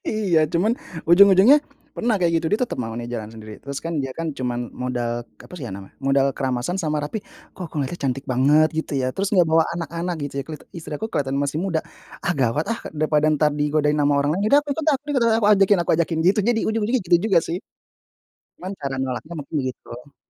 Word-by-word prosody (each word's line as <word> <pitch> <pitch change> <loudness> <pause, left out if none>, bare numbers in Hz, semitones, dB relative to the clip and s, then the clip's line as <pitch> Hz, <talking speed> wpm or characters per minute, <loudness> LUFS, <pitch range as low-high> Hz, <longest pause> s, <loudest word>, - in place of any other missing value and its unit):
iya 200 -7 +2 0.2
cuman 200 +7 +3 0.4
ujung-ujungnya, 195 - +7 0.4
pernah 235 -1 +1
kayak 170 -1 +2
gitu 165 0 -1
dia 210 - +2
tetep - - -7
mau 115 0 -5
nih 120 0 -5
jalan 110 -2 -5
sendiri 110 -1 -10
terus 140 0 -5
kan 165 - -3
dia 135 -1 -4
kan 165 - -2
cuman 125 -1 -2 0.2
modal 120 -2 -2 0.3
apa - - -16
sih 140 - -7
ya - - -7
namanya 95 -1 -12
modal 135 0 +3
keramasan 130 +7 -1
sama 155 -2 -1
rapi 215 +9 -4 0.3
kok 185 - -9
aku - - -21
ngelihatnya 145 +5 -3
cantik 135 +1 -1
banget 150 +5 +4
gitu 160 - -3
ya 130 - 0
terus 195 0 -1
gak 180 - +6
bawa 160 0 +5
anak-anak 170 +1 -3
gitu 140 - -6
ya - - -7 0.3
istri 155 -2 -8
aku 220 - -4
kelihatan 135 -1 -1
masih 140 +2 -1
muda, 170 -5 0 0.4
ah, 175 - +2
gawat, 125 +5 +1
ah, 230 - -5 0.2
daripada 150 0 +1
entar 150 0 +3
digodain 150 0 +1
sama 145 0 +3
orang 145 +1 +1
lain 195 - -2
ya - - +2
udah - - +6
aku 290 - -13
ikut 320 +2 -4
aku 280 +1 -2
ikut 260 - +2
aku 225 -2 +1
ajakin 195 0 +4
aku - - -1
ajakin 165 -1 0
jadi 195 +3 +4
itu 230 -1 +1
ujung 225 -1 -1
ujungnya 250 +3 +1
gitu 175 - +6
juga 195 - +5
sih, 170 - -1 1.0
cuman 185 +2 -5
cara 135 -1 -3
nolaknya 130 +5 -4
mungkin 150 +2 -5
gitu. 125 +1 -10
155 Hz, 220 wpm, -22 LUFS, 135-190 Hz, 1.0 s, ujung-ujungnya